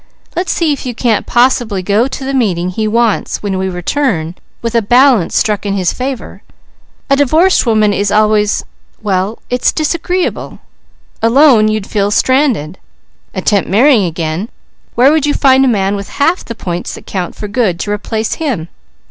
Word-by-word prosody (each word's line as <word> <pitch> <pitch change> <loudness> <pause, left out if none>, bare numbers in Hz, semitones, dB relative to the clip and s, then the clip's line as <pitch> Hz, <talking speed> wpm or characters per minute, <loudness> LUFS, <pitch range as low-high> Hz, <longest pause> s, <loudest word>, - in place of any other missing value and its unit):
Let's 360 +2 -1
see 320 -3 +1
if 280 - -6
you 245 -2 -5
can't 230 -3 0
possibly 240 -5 +1
go 210 +6 +2
to 270 0 -6
the 275 - -3
meeting 185 -9 0
he 215 +4 -2
wants 230 -1 0
when 195 -2 -2
we 190 0 -1
return 180 - -2 0.3
with 230 0 -2
a 230 - +3
balance 245 -3 +3
struck 210 -2 0
in 200 -1 -2
his 185 -3 0
favour. 260 -1 -5 0.7
A - - +6
divorced 310 +4 +3
woman 215 -2 +3
is 200 0 -1
always 210 0 +2 0.4
well, 195 +1 -1
it's 250 0 +2
disagreeable. 340 +3 -2 0.6
Alone 230 -1 +5
you'd 215 -2 -1
feel 200 -1 -1
stranded. 230 - +1 0.6
Attempt 200 -3 0
marrying 230 +2 +4
again, 165 +4 -3 0.5
where 260 +4 +5
would 305 -2 +1
you 290 - 0
find 265 -1 +4
a - - +3
man 200 -4 +1
with 200 -1 -6
half 330 +6 0
the 230 - -7
points 175 -4 -5
that - - -13
count 180 -3 -4
for 210 - -6
good, 200 -5 0
to 205 - -3
replace 220 +1 -2
him? 230 - -2
220 Hz, 170 wpm, -13 LUFS, 200-265 Hz, 0.7 s, A